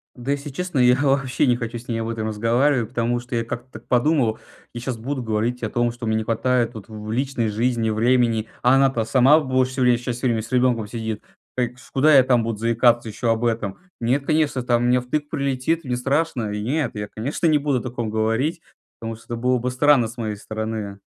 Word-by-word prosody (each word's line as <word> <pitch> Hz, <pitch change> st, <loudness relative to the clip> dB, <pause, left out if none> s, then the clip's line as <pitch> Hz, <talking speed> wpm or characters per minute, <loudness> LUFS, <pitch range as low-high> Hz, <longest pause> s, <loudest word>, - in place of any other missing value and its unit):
Да, 125 Hz, +3 st, -4 dB
если 145 Hz, +1 st, -3 dB
честно, 175 Hz, +1 st, -3 dB
я 125 Hz, 0 st, +6 dB
вообще 135 Hz, -1 st, +1 dB
не 125 Hz, -2 st, +3 dB
хочу 120 Hz, 0 st, -4 dB
с 120 Hz, -, -12 dB
ней 115 Hz, -1 st, -1 dB
об 115 Hz, -, -3 dB
этом 110 Hz, -1 st, -3 dB
разговаривать, 115 Hz, +3 st, +1 dB
потому 120 Hz, 0 st, 0 dB
что 120 Hz, +1 st, -6 dB
я 115 Hz, -, 0 dB
как-то 120 Hz, +2 st, -6 dB
так 110 Hz, +2 st, -11 dB
подумал: 125 Hz, -3 st, +2 dB, 0.3 s
я 120 Hz, -, -5 dB
щас 120 Hz, 0 st, -4 dB
буду 130 Hz, +4 st, -4 dB
говорить 115 Hz, +2 st, -1 dB
о 110 Hz, -, -2 dB
том, 120 Hz, +2 st, 0 dB
что 120 Hz, 0 st, -8 dB
мне 110 Hz, -, +1 dB
не 110 Hz, -, 0 dB
хватает 120 Hz, +1 st, +1 dB
тут 110 Hz, -2 st, -10 dB
в 110 Hz, -, -11 dB
в 110 Hz, -, -4 dB
личной 125 Hz, -2 st, -1 dB
жизни 115 Hz, +1 st, 0 dB
времени, 115 Hz, 0 st, +2 dB, 0.2 s
а 125 Hz, +2 st, +5 dB
она-то 135 Hz, -4 st, +3 dB
сама 130 Hz, +6 st, +5 dB
в 150 Hz, -, -5 dB
больше 130 Hz, 0 st, +1 dB
всего 130 Hz, -, 0 dB
времени 125 Hz, -1 st, +4 dB
часть 120 Hz, 0 st, -4 dB
времени 120 Hz, -3 st, +2 dB
с 115 Hz, +3 st, -7 dB
ребенком 125 Hz, -4 st, +2 dB
сидит, 110 Hz, -1 st, -4 dB, 0.4 s
так 125 Hz, -1 st, 0 dB
чт -, -, -17 dB
куда 145 Hz, +2 st, +4 dB
я 130 Hz, -, +8 dB
там 125 Hz, -3 st, +2 dB
буду 115 Hz, -1 st, -3 dB
заикаться 115 Hz, +1 st, +2 dB
еще 115 Hz, +3 st, -2 dB
об 115 Hz, +1 st, +1 dB
этом? 110 Hz, -4 st, -1 dB, 0.2 s
Нет, 130 Hz, +4 st, 0 dB
конечно, 150 Hz, -4 st, +1 dB
там 120 Hz, -1 st, +1 dB
мне 125 Hz, +1 st, +3 dB
втык 145 Hz, +4 st, -3 dB
прилетит, 140 Hz, +3 st, -1 dB
мне 125 Hz, -3 st, -2 dB
страшно. 135 Hz, -3 st, 0 dB
И 105 Hz, 0 st, -3 dB
нет, 145 Hz, +5 st, 0 dB
я, 105 Hz, -1 st, -5 dB
конечно, 140 Hz, +9 st, -1 dB
не 155 Hz, -2 st, +4 dB
буду 140 Hz, -3 st, 0 dB
о -, -, -7 dB
таком 120 Hz, -3 st, -4 dB
говорить, 115 Hz, +10 st, 0 dB, 0.4 s
потому 115 Hz, 0 st, -4 dB
что 115 Hz, -, -19 dB
это 120 Hz, -, -4 dB
было 125 Hz, +2 st, +1 dB
бы 125 Hz, -, -2 dB
странно 130 Hz, -1 st, +4 dB
с 115 Hz, -, -10 dB
моей 110 Hz, -3 st, -3 dB
стороны, 110 Hz, +1 st, -4 dB
э. 100 Hz, -2 st, -6 dB
120 Hz, 235 wpm, -22 LUFS, 115-130 Hz, 0.4 s, я